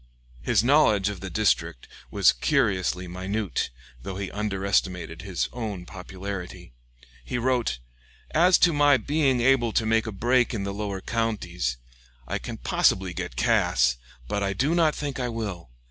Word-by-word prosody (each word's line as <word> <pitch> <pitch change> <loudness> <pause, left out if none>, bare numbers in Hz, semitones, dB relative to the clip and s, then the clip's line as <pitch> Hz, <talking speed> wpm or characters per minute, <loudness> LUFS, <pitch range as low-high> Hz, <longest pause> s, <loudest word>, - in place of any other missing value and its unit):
His 115 -4 +2
knowledge 120 -8 +4
of 100 -3 -6
the 95 +1 -6
district 95 - 0 0.2
was - - +4
curiously 90 +7 0
minute, 95 +2 -2 0.3
though 95 +8 -6
he 100 -1 -4
underestimated 95 -5 -1
his 95 -4 -2
own 105 -7 -5
popularity. 95 -6 -7 0.5
He 90 - -3
wrote: 120 - 0 0.5
"As 175 +3 +5
to 170 - +1
my 145 -2 +5
being 140 -3 +1
able 120 -2 +3
to 110 - +1
make 110 0 +2
a - - -3
break 120 +4 +1
in 100 - -3
the 100 0 -3
lower 100 -2 -4
counties,... 90 - -2 0.5
I - - -2
can - - -7
possibly 95 -1 +1
get 65 - -5
Cass, 60 0 +2 0.3
but 100 - -2
I 100 0 0
do 135 - +1
not 165 -3 +3
think 145 -2 -4
I 125 -1 -1
will. 100 - -5
100 Hz, 155 wpm, -25 LUFS, 90-120 Hz, 0.5 s, As